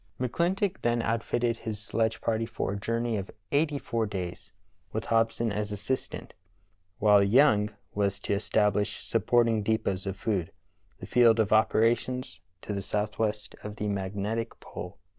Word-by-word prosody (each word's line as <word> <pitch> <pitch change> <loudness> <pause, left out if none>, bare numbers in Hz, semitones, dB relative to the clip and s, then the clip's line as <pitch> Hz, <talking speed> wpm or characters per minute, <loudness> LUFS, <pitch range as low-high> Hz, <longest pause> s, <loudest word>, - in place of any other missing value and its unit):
McClintock 175 - 0
then 120 0 +1
outfitted 115 +1 0
his 110 -2 -4
sledge 110 +1 -1
party 115 0 0
for 110 -3 -3
a - - -3
jour 115 +3 -1
ney 120 -2 0
of 95 -1 -5 0.2
eighty 145 0 +2
four 115 -5 -1
days, 90 -5 -5 0.4
with 110 - -3
Hobson 115 0 +1
as 105 0 -2
assistant, 105 +6 -3 0.6
while 105 -1 +6
Young 105 -1 +5 0.2
was 100 -1 0
to - - -1
establish 105 0 +1
supporting 115 0 +2
depots 100 -3 -1
of 95 0 -3
food, 95 -7 -1 0.5
the - - -8
field 115 -2 +5
of 110 -1 +3
operations 115 +3 +2 0.2
to 105 - -4
be 100 - -2
southwest 105 +1 -2
of 105 0 -7
the 105 -1 -3
magnetic 100 +3 -2
pole. 90 +2 -8
110 Hz, 150 wpm, -28 LUFS, 105-115 Hz, 0.6 s, while